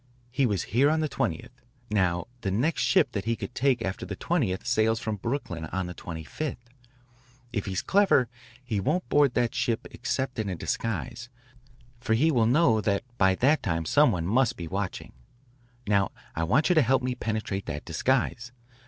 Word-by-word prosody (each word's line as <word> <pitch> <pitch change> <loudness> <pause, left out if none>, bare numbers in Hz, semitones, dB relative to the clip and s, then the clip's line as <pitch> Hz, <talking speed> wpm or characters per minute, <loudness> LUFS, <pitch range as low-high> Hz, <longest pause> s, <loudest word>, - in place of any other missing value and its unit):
He 125 +1 +2
was 100 -5 0
here 135 +5 +5
on 160 +1 +1
the 155 - +1
20th. 110 - -2 0.4
Now 90 -4 +1 0.2
the 100 - -1
next 125 - 0
ship 155 -9 +3
that 100 -4 -3
he 115 0 +1
could 120 - -7
take 130 -3 +1
after 95 +1 -3
the - - -5
20th 115 - -1
sails 110 -2 +2
from 110 -2 -3
Brooklyn 95 - -3
on 95 +3 -3
the 90 - -6
25th. 85 - -5 1.0
If 105 -3 -2
he's 95 -2 -2
clever 195 -11 +4 0.4
he 115 -5 -2
won't 180 - 0
board 145 -4 +3
that 120 +1 +1
ship 120 -4 -1
except 130 -2 -3
in 105 -2 -1
a 90 - -2
disguise, 120 +6 -3 0.7
for 110 -2 +1
he 155 +8 +3
will 115 -6 +3
know 120 -4 +4
that 100 0 0 0.2
by 95 -1 +4
that 145 +9 +3
time 80 0 -1
some 150 - +4
one 85 -2 -2
must 120 +6 +2
be 85 - -5
watching. 95 +3 -4 0.7
Now 100 -1 +2 0.3
I 80 - 0
want 125 - +3
you - - +5
to 160 - +5
help 130 +1 +2
me 125 0 0
penetrate 110 -4 -3
that 75 0 -5
disguise. 120 -1 0
115 Hz, 185 wpm, -27 LUFS, 95-130 Hz, 1.0 s, here